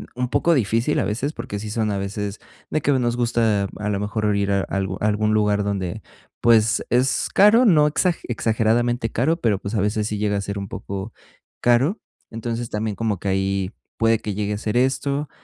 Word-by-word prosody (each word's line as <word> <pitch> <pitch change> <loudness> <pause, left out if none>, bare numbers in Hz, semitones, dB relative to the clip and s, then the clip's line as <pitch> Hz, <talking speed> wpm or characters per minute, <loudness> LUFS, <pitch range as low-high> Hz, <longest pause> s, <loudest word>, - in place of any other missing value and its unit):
un 125 0 -2
poco 165 +4 +2
difícil, 115 -1 +1
a - - +1
veces, 125 +8 -2
porque 100 - -5
sí 105 0 -6
son 110 -1 -1
a 100 - -1
veces, 100 +1 -4 0.3
de 155 - 0
que 145 - +1
nos 120 -2 0
gusta 115 -4 +1
a 105 0 -3
lo 100 -1 -1
mejor 105 0 -1
ir 100 0 0
a 100 0 +2
algu 95 0 -3
algún 105 0 +1
lugar 105 -1 +2
donde, 100 0 -3 0.4
pues, 115 -1 +4
es 125 +2 +1
caro, 215 +5 +6
no 155 -7 +5
exag 165 +3 +1
exageradamente 115 0 0
caro, 160 +8 +1
pero, 105 -4 +1
pues, 100 +3 -5
a 100 - +1
veces, 105 +1 0
sí 105 - -3
llega 105 -1 0
a - - -1
ser 100 0 -4
un 100 -1 -4
poco 100 +2 -6 0.5
caro. 130 - +3 0.3
Entonces, 115 +1 -4
también 105 -1 -2
como 105 -3 -1
que 100 - -5
ahí 95 0 0 0.3
puede 115 0 +3
que 105 - -4
llegue 105 +1 -2
a - - -3
ser 105 +1 -3
esto. 140 +3 0
110 Hz, 200 wpm, -22 LUFS, 100-120 Hz, 0.5 s, caro